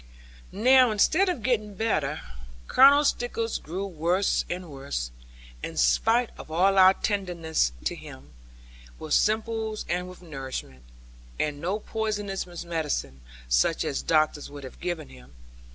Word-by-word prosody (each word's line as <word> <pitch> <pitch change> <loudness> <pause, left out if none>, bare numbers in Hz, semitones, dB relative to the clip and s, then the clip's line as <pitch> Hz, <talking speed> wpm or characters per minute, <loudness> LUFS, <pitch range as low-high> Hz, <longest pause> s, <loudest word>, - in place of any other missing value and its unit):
Now, 255 +4 +5
instead 295 - +3
of 330 - -3
getting 215 -5 0
better, 155 -9 -1 0.5
Colonel 285 +2 +7
Stickles 230 -3 -1
grew 185 +5 -5
worse 180 +2 0
and 175 -2 -5
worse, 135 - -4 0.5
in - - -6
spite 225 - +3
of - - -10
all 190 +4 +3
our 190 +1 +7
tendance 175 - -1
of - - +1
him, 70 +3 -8 0.7
with 155 - -4
simples 220 0 0
and 180 +1 -2
with 180 0 -13
nourishment, 135 - -7 0.6
and 145 -1 -1
no 185 +5 -1
poisonous 210 -4 -3 0.2
medicine, 155 - -3 0.3
such - - +2
as - - -2
doctors 155 - +1
would 145 -1 -10
have 130 - -10
given 175 - -4
him. 65 +1 -16
180 Hz, 135 wpm, -26 LUFS, 145-215 Hz, 0.7 s, Colonel